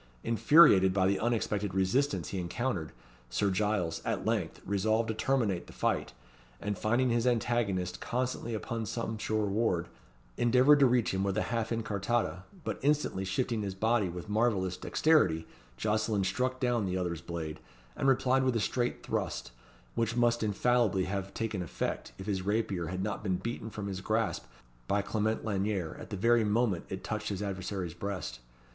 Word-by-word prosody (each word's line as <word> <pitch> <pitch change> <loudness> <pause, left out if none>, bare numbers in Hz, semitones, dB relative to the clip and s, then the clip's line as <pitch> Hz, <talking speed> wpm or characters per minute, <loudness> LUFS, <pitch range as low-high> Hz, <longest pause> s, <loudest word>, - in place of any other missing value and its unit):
Infuriated 115 - +6
by 95 -2 +3
the 95 +1 +2
unexpected 105 -4 -1
resistance 125 +10 +1
he 95 - -3
encountered, 90 -2 -2 0.4
Sir 100 +9 +1
Giles, 95 -5 0
at - - -2
length, 105 -7 -1
resolved 110 +3 +1
to - - +1
terminate 110 -7 0
the - - -12
fight; - - 0 0.5
and, 105 0 -2
finding 120 +6 +1
his 120 +1 +2
antagonist 110 -7 0
constantly 125 -2 -2
upon 115 +1 -3
some 115 0 -3
sure 110 0 0
ward, 100 -4 0 0.5
endeavoured 130 +5 +5
to 135 - +7
reach 120 -4 +2
him 95 0 0
with 100 -1 0
a - - +2
half 115 -2 0
incartata; 110 -3 -1 0.2
but - - -3
instantly 145 -9 +1
shifting 110 +4 -1
his 100 -2 -3
body 110 -1 +2
with 90 +3 -7
marvellous 105 -4 +1
dexterity, 150 - +2 0.3
Jocelyn 105 - +1
struck 130 +7 -1
down 120 -5 +1
the 95 0 -1
other's 85 -3 -2
blade, 80 -2 -5 0.4
and 135 - 0
replied 130 0 +3
with 130 -2 +1
a - - +2
straight 120 +3 -1
thrust, - - -3 0.4
which 115 0 0
must 120 -1 +3
infallibly 110 -2 +2
have 100 +1 -3
taken 110 -4 -2
effect, 85 - -3
if 95 - -8
his 100 -3 -1
rapier 100 -3 -1
had 95 +2 -3
not 105 0 -3
been 95 -4 0
beaten 110 +4 -4
from 105 -2 -6
his 95 -2 -4
grasp 110 +3 0 0.4
by 100 0 +1
Clement 110 +2 -1
Lanyere 100 -5 -1
at - - -9
the 105 - -4
very 115 +3 +4
moment 105 -3 +1
it 95 - -5
touched 110 0 -3
his 100 0 -3
adversary's 95 -3 -3
breast. 90 -9 -5
105 Hz, 170 wpm, -31 LUFS, 95-115 Hz, 0.5 s, to